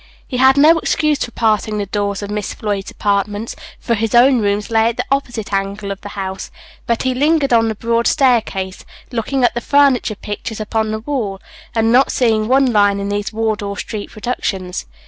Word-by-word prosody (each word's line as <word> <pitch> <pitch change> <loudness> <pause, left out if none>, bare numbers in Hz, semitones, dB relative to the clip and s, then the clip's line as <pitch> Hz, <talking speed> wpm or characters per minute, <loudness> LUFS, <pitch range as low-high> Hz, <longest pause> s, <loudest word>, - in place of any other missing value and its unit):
He 250 - -3
had 265 +2 +5
no 315 +3 +6
excuse 305 -2 +1
for - - -5
passing 215 -2 0
the 205 - -1
doors 200 0 -2
of 205 - -5
Miss 210 -1 -3
Floyd's 205 -2 -3
apartments, 205 +2 -2 0.2
for 235 - -1
his 225 0 0
own 250 +1 +6
rooms 205 +1 -1
lay 225 0 +3
at 235 - -5
the - - -2
opposite 240 -7 -2
angle 200 +1 -2
of 195 - -6
the 205 - -8
house; 190 -1 -4 0.4
but 235 -1 0
he 260 0 +1
lingered 290 0 +2
on 225 -1 +4
the 220 - -3
broad 230 +2 0
staircase, 220 -9 +1 0.3
looking 250 +3 -1
at 240 - +3
the 240 - -3
furniture 275 -5 +3
pictures 210 +2 -6
upon 220 0 -1
the 220 0 -3
walls, 225 -7 -3 0.4
and 225 0 +2
not 260 +3 +4
seeing 220 -3 +1
one 260 0 +3
line 205 -1 +3
in 200 0 -3
these 205 0 -2
Wardour 215 -2 -2
street 210 -3 -5
productions. 195 -5 -4
220 Hz, 195 wpm, -17 LUFS, 205-245 Hz, 0.4 s, no